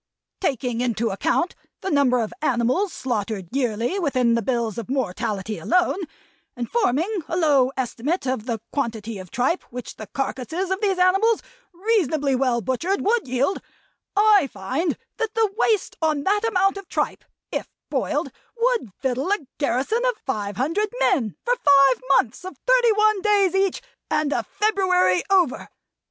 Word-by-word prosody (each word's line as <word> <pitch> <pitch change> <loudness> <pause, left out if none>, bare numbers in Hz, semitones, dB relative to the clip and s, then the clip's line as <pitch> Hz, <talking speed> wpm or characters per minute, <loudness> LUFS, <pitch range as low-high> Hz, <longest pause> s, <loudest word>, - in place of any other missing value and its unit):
Taking 250 - -1
into 235 -2 0
account 330 - 0 0.3
the 385 - -3
number 255 -5 +3
of 215 - -5
animals 265 - +1
slaughtered 215 - -3
yearly 245 - 0
within 255 -8 +2
the 230 - +2
bills 235 -1 -1
of 230 - -7
mortality 215 -4 -2
alone; 360 +1 +2 0.6
and 240 -2 -4
forming 395 - 0
a 340 - -2
low 280 -6 +4
estimate 265 +6 -2
of 255 -3 -2
the 230 -2 -1
quantity 225 -6 -3
of 185 -1 -10
tripe 260 - 0
which 245 0 -8
the 215 - -8
carcases 310 +7 -3
of 380 +2 -1
these 395 -3 +1
animals, 390 +5 +3 0.3
reasonably 340 - +1
well 250 -2 +1
butchered, 330 - -1
would 445 - +1
yield 260 +9 0 0.5
I 410 -6 +5
find 265 - -2 0.2
that 450 -2 -2
the 440 -3 +2
waste 440 -3 +1
on 305 -3 +1
that 415 +5 +1
amount 390 -2 +2
of 395 -2 -9
tripe, - - -2 0.3
if - - -3 0.2
boiled, - - -1 0.3
would 465 - +1
victual 265 +5 0
a - - +2 0.2
garrison 285 - 0
of - - +1
five 205 -6 -3
hundred 330 - 0
men 265 - +1
for 485 - +3
five 275 - +5
months 250 +5 +1
of 370 - -8
thirty - - +5
one 425 -1 +3
days 405 -3 +3
each, 385 +4 +1 0.3
and 300 -1 +1
a - - +1
February 375 - +2
over. 360 -9 +2
285 Hz, 155 wpm, -23 LUFS, 245-390 Hz, 0.6 s, I